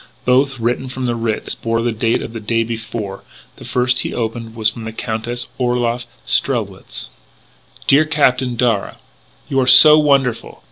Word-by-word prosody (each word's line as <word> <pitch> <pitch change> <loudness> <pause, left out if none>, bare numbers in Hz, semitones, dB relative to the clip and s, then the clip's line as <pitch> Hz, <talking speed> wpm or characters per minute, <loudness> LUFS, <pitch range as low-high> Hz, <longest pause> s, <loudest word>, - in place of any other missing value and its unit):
Both, 135 +1 +2
written 120 +3 -1
from 130 0 -5
the 120 - 0
Ritz, 115 -2 -2
bore 115 0 -2
the 120 - 0
date 115 +1 0
of 115 - -8
the 115 - -5
day 115 +2 0
before: 110 -3 -6 0.3
the - - -12
first 125 0 +1
he - - -3
opened 115 -1 -4
was 110 -1 +1
from 115 0 -9
the 110 - -5
Countess 115 +2 -4
Orloff 120 -1 -1 0.2
Strelwitz: - - -2 0.8
"Dear 145 +3 +4
Captain 130 -5 +1
Darragh, 115 -4 0 0.3
" - - -34
You 135 - 0
are 130 - +1
so 150 +4 +9
wonderful! 140 -5 0
120 Hz, 170 wpm, -18 LUFS, 115-125 Hz, 0.8 s, so